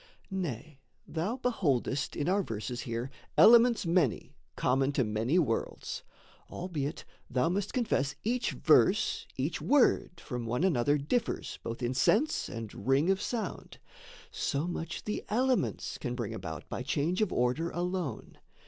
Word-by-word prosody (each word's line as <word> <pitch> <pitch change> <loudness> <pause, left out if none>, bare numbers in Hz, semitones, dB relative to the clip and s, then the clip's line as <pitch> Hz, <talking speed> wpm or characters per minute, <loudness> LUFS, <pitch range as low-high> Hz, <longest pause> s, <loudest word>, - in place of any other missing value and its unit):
Nay, 155 - -4 0.3
thou 180 +10 -2
beholdest 150 - 0
in 145 - -1
our 195 +3 +3
verses 120 - -4
here 115 +3 -3 0.3
Elements 235 -1 +7
many, 165 -8 +1 0.2
common 135 +2 +2
to 130 - +2
many 110 +8 0
worlds, 140 -10 -1 0.5
Albeit 160 -4 -4 0.2
thou 125 +6 +1
must 200 +3 -1
confess 145 - 0
each 245 +2 0
verse, 435 +2 +3
each - - -2
word 250 -10 +3
From 125 -7 -5
one 125 +8 0
another 145 -5 +3
differs 225 - -2
both 115 +2 -5
in 120 +1 0
sense 225 - +2
And 115 -2 -7
ring 140 +7 +4
of 195 - 0
sound 225 -6 -4 0.5
so 140 +3 -1
much 170 -2 -4
the 210 - -3
elements 255 +3 0
Can 125 -3 -3
bring 120 -4 -3
about 80 -5 -6
by - - -4
change 155 - 0
of 215 - +1
order 125 +7 +1
alone. 175 - -3
155 Hz, 140 wpm, -30 LUFS, 125-195 Hz, 0.5 s, Elements